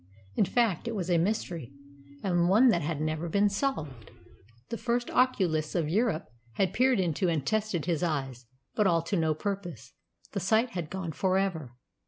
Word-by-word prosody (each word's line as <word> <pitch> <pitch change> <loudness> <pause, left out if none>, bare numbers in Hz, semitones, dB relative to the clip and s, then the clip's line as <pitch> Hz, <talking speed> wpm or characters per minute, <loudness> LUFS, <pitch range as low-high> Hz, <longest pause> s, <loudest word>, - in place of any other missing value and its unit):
In - - +3
fact, 230 -1 +1
it 230 - -2
was 185 -3 -2
a 170 - +4
mystery, 170 - -2 0.5
and 175 -2 +2
one 230 +7 +6
that 170 -7 +3
had 155 -1 -2
never 155 +2 -2
been 200 +4 +3
solved. 160 - -3 0.6
The 230 - -3
first 240 +1 -1
oculists 175 -12 +1
of 165 -4 +1
Europe 205 -2 +1 0.3
had 190 +7 0
peered 255 -2 +3
into 180 +1 +1
and 155 -5 -1
tested 215 -7 0
his 170 -2 0
eyes, 135 -7 -2 0.3
but 210 -2 +2
all 165 -3 +2
to 170 - -2
no 160 -3 +1
purpose. 175 - -5 0.4
The - - -2
sight 220 +6 +2
had 175 -7 -4
gone 185 -2 -4
for 185 +4 +1
ever. 160 -11 -2
180 Hz, 180 wpm, -29 LUFS, 160-210 Hz, 0.6 s, one